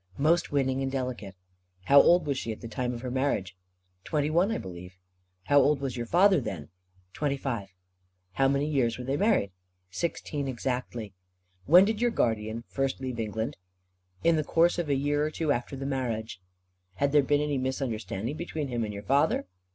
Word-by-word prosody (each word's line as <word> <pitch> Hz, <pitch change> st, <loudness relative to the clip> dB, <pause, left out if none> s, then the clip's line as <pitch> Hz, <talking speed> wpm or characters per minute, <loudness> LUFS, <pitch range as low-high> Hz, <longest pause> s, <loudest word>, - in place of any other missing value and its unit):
"Most 160 Hz, +5 st, +2 dB
winning 135 Hz, -2 st, +1 dB
and 135 Hz, 0 st, -1 dB
delicate." 125 Hz, -7 st, -4 dB, 0.5 s
"How 140 Hz, +8 st, +7 dB
old 175 Hz, -1 st, +4 dB
was 140 Hz, -2 st, 0 dB
she 115 Hz, -3 st, -3 dB
at 110 Hz, -, -7 dB
the 115 Hz, -, -6 dB
time 125 Hz, +3 st, -2 dB
of 120 Hz, -, -7 dB
her 125 Hz, -1 st, -4 dB
marriage?" 125 Hz, -9 st, -1 dB, 0.5 s
"Twenty 150 Hz, -1 st, -1 dB
one, 175 Hz, +5 st, +3 dB
I 225 Hz, -, -1 dB
believe." 90 Hz, 0 st, -9 dB, 0.5 s
"How 145 Hz, +7 st, +4 dB
old 140 Hz, +1 st, +3 dB
was 135 Hz, -3 st, -3 dB
your 120 Hz, -1 st, -4 dB
father 185 Hz, -, +4 dB
then?" 95 Hz, -10 st, -6 dB, 0.4 s
"Twenty 140 Hz, -2 st, -1 dB
five." 115 Hz, -8 st, -3 dB, 0.6 s
"How 135 Hz, +6 st, +2 dB
many 140 Hz, +1 st, +1 dB
years 130 Hz, -6 st, +1 dB
were 125 Hz, -, -6 dB
they 135 Hz, +2 st, -1 dB
married?" 145 Hz, -, +2 dB, 0.4 s
"Sixteen, 145 Hz, -, -3 dB
exactly." 125 Hz, -4 st, -3 dB, 0.5 s
"When 180 Hz, +6 st, +8 dB
did 220 Hz, +1 st, -1 dB
your 240 Hz, -, +3 dB
guardian 110 Hz, -, -1 dB
first 135 Hz, -1 st, -2 dB
leave 130 Hz, -3 st, -4 dB
England?" 110 Hz, +4 st, -3 dB, 0.7 s
"In 165 Hz, -1 st, +4 dB
the 155 Hz, -, +1 dB
course 170 Hz, +3 st, +2 dB
of 165 Hz, -4 st, -2 dB
a 140 Hz, -, +3 dB
year 145 Hz, +2 st, +1 dB
or 155 Hz, -, 0 dB
two 155 Hz, -1 st, -1 dB
after 125 Hz, +1 st, -2 dB
the 135 Hz, 0 st, -5 dB
marriage." 115 Hz, -8 st, -3 dB, 0.5 s
"Had 140 Hz, +7 st, +1 dB
there 150 Hz, 0 st, +5 dB
been 145 Hz, +2 st, +2 dB
any 145 Hz, -2 st, 0 dB
misunderstanding 125 Hz, -2 st, -3 dB
between 155 Hz, -4 st, -4 dB
him 120 Hz, -2 st, -1 dB
and 105 Hz, -, -3 dB
your 100 Hz, 0 st, -7 dB
father?" 140 Hz, +8 st, +2 dB
135 Hz, 190 wpm, -28 LUFS, 115-150 Hz, 0.7 s, When